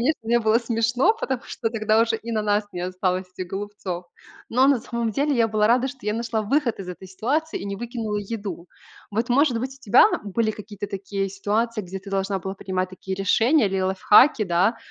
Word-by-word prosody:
конечно, 295 +6 +1
мне 235 +2 +2
было 220 0 +3
смешно, 235 - +2
потому 265 - -2
что 225 -3 -3
тогда 215 -1 +2
уже 230 -1 0
и 230 +1 -8
на 215 -1 0
нас 210 0 +1
не 175 - -5
осталось 185 0 -1
этих 185 - -4
голубцов. 195 -3 -5 0.5
Но 255 +3 +4
на 275 - +4
самом 235 -1 -2
деле 285 +4 +1
я 230 -1 +3
была 210 -1 +2
рада, 245 +3 +3
что 265 +1 -9
я 210 0 -1
нашла 225 -1 -1
выход 255 +1 0
из 190 -2 -7
этой 180 +1 -8
ситуации, 290 - -1
и - - -6
не 200 0 -4
выкинула 225 -2 -3
еду. 200 -4 -5 0.4
Вот, 225 +3 -1
может 250 -1 +3
быть, 260 +2 -4
у 270 - -20
тебя 210 - +6 0.2
были 215 +2 0
какие-то 205 -1 -7
такие 195 0 -3
ситуации, 215 +3 -1
где 190 0 -7
ты 200 +1 -11
должна 195 0 -1
была 190 +2 -5
принимать 185 -1 -3
такие 190 +1 -5
решения 225 +6 +3
или 195 0 -1
лайфхаки, 210 +6 +5
да, 185 +6 +2
215 Hz, 210 wpm, -24 LUFS, 195-235 Hz, 0.5 s, тебя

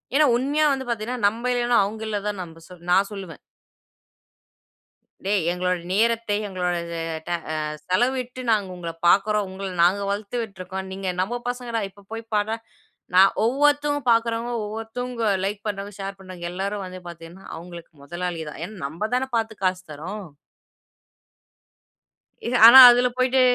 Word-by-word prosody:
ஏன்னா 305 +1 +6
உண்மையா 285 +5 +1
வந்து 265 -1 -4
பாத்தீங்கன்னா, 235 +2 -3
நம்ம 230 +4 -2
இல்லன்னா, 240 -1 +2
அவுங்க 215 +2 -6
இல்ல 210 - -1
தான், 205 -2 -3
நம்ப 165 -1 -12 0.3
நான் 195 +2 +4
சொல்லுவேன். 190 -5 -8 1.9
"டேய்! 200 -2 +1
எங்களோட 180 +1 0
நேரத்தை 225 +1 +1
எங்களோட 180 -2 -2
அது- 170 0 -5 0.3
ட - - -3 0.2
அ - - -2 0.3
செலவிட்டு 250 +6 0
நாங்க 205 -3 +1
உங்கள 170 -2 -5 0.2
பாக்குறோம். 205 +3 +3
உங்கள 195 +1 -6 0.2
நாங்க 185 +4 +3
வளத்து 205 +3 -3
விட்ருக்கோம். 190 -2 -7
நீங்க 190 0 -5
நம்ம 240 +6 -2
பசங்கடா! 245 -2 -3
இப்ப 200 +1 -20
போய் 225 0 -5
பார்டா!" 210 +2 +1 0.6
நான் 190 +1 +7
ஒவ்வொருத்தவுங்க 290 +4 +2
பாக்குறவுங்க 230 +1 +1
ஒவ்வொருத்தவுங்க 225 +2 -4 0.2
லைக் 205 +1 -3
பண்றாங்க, 200 0 -4
ஷேர் 195 0 -5
பண்றாங்க. 185 -2 -10
எல்லாரும் 195 +2 -3
வந்து 185 0 -8
பாத்தீங்கன்னா, 170 +3 -12
அவுங்களுக்கு 170 0 -11
முதலாளி 175 +2 -4
தான். 150 - -10
ஏன்னா 215 +3 -10
நம்ப 170 +9 -4
தான 255 +1 +1
பாத்து 225 -1 -1
காசு 185 0 +1
தரோம். 185 +8 -6 2.2
எ - - 0 0.2
ஆனா 265 +3 +11
அதுல 245 +1 +3
போயிட்டு 255 +1 +3
205 Hz, 145 wpm, -23 LUFS, 185-235 Hz, 2.2 s, ஆனா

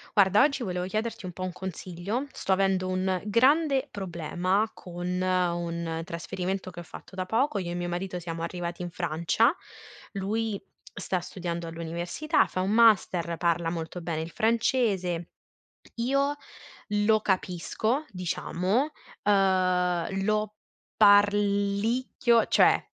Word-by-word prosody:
Guarda, 200 0 +5
oggi 280 -3 +1
volevo 180 -3 -2
chiederti 215 +1 -3
un 180 - -5
po' 185 +1 -7
un 185 - -2
consiglio. 185 - -4
Sto - - -4
avendo 190 -1 +1
un 185 0 0
grande 270 +5 +3
problema 185 +3 -1
con 175 0 -8 0.2
un 170 -2 -1
trasferimento 185 +3 -4
che 175 - -10
ho - - -6
fatto 180 - -12
da 185 -1 -2
poco. 225 +3 +1
Io 175 -2 -4
e - - -3
mio 175 0 -2
marito 180 +1 -3
siamo 165 -1 -5
arrivati 175 0 -4
in 175 - -3
Francia, 170 - +1 0.6
lui 210 +1 -2 0.3
sta 185 - -2
studiando 170 -1 -5
all'università, 170 - 0
fa 185 - -3
un 190 +2 0
master, 190 -7 +4
parla 170 -1 +1
molto 165 +1 -5
bene 165 -2 -3
il 165 +1 -6
francese. 215 -7 +1 0.7
Io 275 +4 +1 0.6
lo 210 +1 +3
capisco, 205 - -1
diciamo, 185 - -1 0.3
uhm, 185 -2 +2
lo 215 0 0 0.4
parlicchio, 205 +3 +3
cioè, - - +4
185 Hz, 130 wpm, -27 LUFS, 175-215 Hz, 0.7 s, Guarda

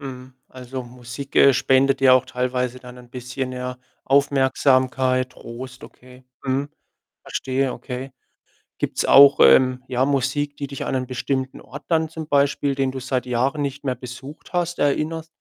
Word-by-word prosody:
Mhm. 130 -2 -9
Also, 130 0 -7
Musik, 125 +2 -9
äh, 140 - +7
spendet 135 +1 +2
dir 130 -1 +7
auch 130 - +3
teilweise 125 0 -2
dann 125 0 -12
'n 120 -1 -16
bisschen, 125 +1 -5
ja, 125 0 -5 0.3
Aufmerksamkeit, 130 -2 +2
Trost, 125 +2 -10
okay. 125 0 -16 0.2
Mhm. 135 +2 -1 0.5
Verstehe, 130 0 -2
okay. 130 +1 -7 0.7
Gibt's - - -1
auch, 140 0 +7
ähm, 130 -1 +5
ja, 130 0 +1
Musik, 145 +1 -1
die 140 - -4
dich 140 -1 -6
an - - -2
einen 130 -1 -2
bestimmten 130 +1 -3
Ort - - -11
dann, 160 -2 +1
zum 160 -1 -7
Beispiel 140 -1 +1
den 135 -1 0
du 130 - -6
seit 130 0 -2
Jahren 130 +4 0
nicht 140 0 -4
mehr 130 -2 0
besucht 130 +7 -11
hast, 175 0 -1
erinnert? 155 +3 0
130 Hz, 160 wpm, -22 LUFS, 125-140 Hz, 0.7 s, äh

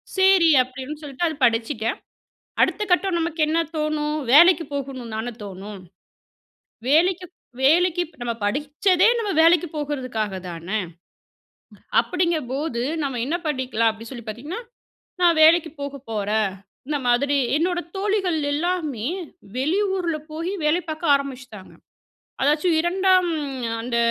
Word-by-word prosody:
சேரி 380 -3 +5
அப்டின்னு 260 +4 -8
சொல்லிட்டு 295 +3 -2
அத 315 - -3
படிச்சுட்டேன். 225 -1 0 0.6
அடுத்த 425 - +2
கட்டம் 360 0 +2
நமக்கு 325 -1 -2
என்ன 320 +2 +1 0.2
தோணும்? 305 0 -1 0.2
வேலைக்கு 340 +3 +7
போகனும்ன்னு 260 -5 -5
தானே 240 +2 -4
தோணும், 195 +1 -8 1.1
வேலைக்கு 360 +4 +3 0.4
வேலைக்கு 350 +5 +4 0.2
நம்ம 240 -1 -1
படிச்சதே 295 - +2
நம்ம 430 -3 -2
வேலைக்கு 335 +1 +5
போகறதுக்காக 255 -8 -3
தானே. 175 +4 -4 1.2
அப்டிங்கபோது 310 -7 -1 0.2
"நம்ம 270 -3 -2
என்ன 305 +7 -1
பண்ணிக்கலாம்" 255 -6 0
அப்டின்னு 225 +1 -9
சொல்லி 240 -4 -8
பார்த்தீங்கன்னா? 290 - -6 0.6
"நான் 345 -1 +5
வேலைக்கு 320 +1 +6
போக 280 0 -5
போறேன்." 215 0 0 0.4
இந்த 300 0 0
மாதிரி 280 +4 +2 0.2
என்னோட 350 +2 0 0.2
தோழிகள் 390 -4 0 0.2
எல்லாருமே 305 -7 -2 0.5
வெளியூர்ல 360 +3 0
போயி 330 +5 -3
வேலை 320 +4 +2
பார்க்க 310 -1 +1
ஆரம்பிச்சிட்டாங்க. 255 -7 -7 0.7
அதாச்சும் 300 +4 +2
2ஆம் 370 +1 +3 0.5
அந்த 235 0 -2
300 Hz, 115 wpm, -23 LUFS, 245-345 Hz, 1.2 s, வேலைக்கு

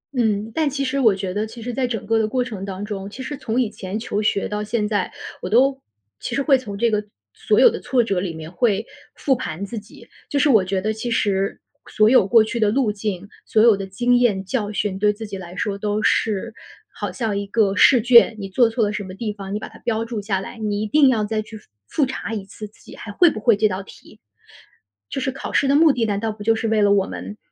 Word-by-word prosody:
嗯， 220 -3 0
但 315 -2 +1
其 275 0 -2
实 270 +1 -1
我 225 -7 +4
觉 190 -1 -4
得 210 +2 -2
其 230 +2 -11
实 245 +1 -4
在 255 +1 0
整 225 -3 -4
个 225 +1 +2
的 220 - +1
过 250 +3 0
程 215 -6 -7
当 195 +1 -5
中， 200 -2 -5
其 260 +6 -8
实 290 - -5
从 255 -3 -2
以 235 -4 0
前 190 0 -6
求 215 -2 -2
学 205 -1 0
到 210 0 -3
现 210 0 -1
在， 205 -3 -1 0.3
我 180 - -4
都 265 +5 +3 0.4
其 - - -4
实 275 - 0
会 275 0 +5
从 215 -6 -4
这 235 +2 +2
个 210 -1 0 0.3
所 210 - +1
有 260 - +8
的 - - -5
挫 245 -1 +1
折 195 -5 -1
里 180 -1 -3
面 160 0 -8
会 210 +2 +1 0.3
复 270 - +1
盘 195 -7 -5
自 225 +2 -6
己。 205 +2 -16 0.2
就 290 - -1
是 290 +1 +3
我 220 -7 +5
觉 190 +1 -1
得 215 +3 -1
其 220 +3 -5
实， 200 -4 0 0.3
所 215 +1 +3
有 250 -7 +5
过 225 +2 +6
去 230 +2 -4
的 215 -2 +3
路 235 0 +1
径， 200 -2 -4 0.2
所 215 - +3
有 230 -2 +6
的 195 0 -6
经 245 +6 +2
验、 210 -6 +1
教 210 -1 -2
训， 200 -2 -2
对 210 +1 +3
自 215 +2 -7
己 205 -2 -7
来 175 -1 -10
说 200 -1 -3
都 210 +1 -1
是 220 +1 0 0.4
好 - - -4
像 225 -5 -2
一 200 - -5
个 200 -1 +1
试 255 +3 +6
卷。 235 0 +6
你 200 -2 -5
做 235 +4 +3
错 225 0 0
了 205 - -2
什 210 - -3
么 185 0 -9
地 210 +1 -4
方， 195 -2 -8
你 - - 0
把 215 - -6
它 - - -15
标 225 -1 -2
注 230 -2 -4
下 200 -2 -1
来， 195 +4 -9
你 210 -1 -2
一 - - -1
定 275 +6 +4
要 225 -4 +1
再 215 +1 -1
去 220 +1 -10
复 210 - -21 0.2
复 290 - +1
查 255 -3 -5
一 200 -3 -5
次 210 +2 -9
自 205 - -25
己 - - -12
还 205 - -8
会 345 - +5
不 - - -6
会 215 -1 +3
这 215 +1 +3
道 190 -1 -4
题。 195 - -16 0.9
就 - - -3
是 265 - -1
考 265 - -7
试 280 - +2
的 275 - +3
目 315 +1 +6
的， 245 -4 0
难 205 -2 -1
道 225 +1 -2
不 210 -1 -9
就 225 +1 +3
是 225 - -2
为 220 -1 +2
了 205 -1 +4
我 200 -1 +3
们， 210 - -7
215 Hz, 290 characters per minute, -21 LUFS, 200-240 Hz, 0.9 s, 有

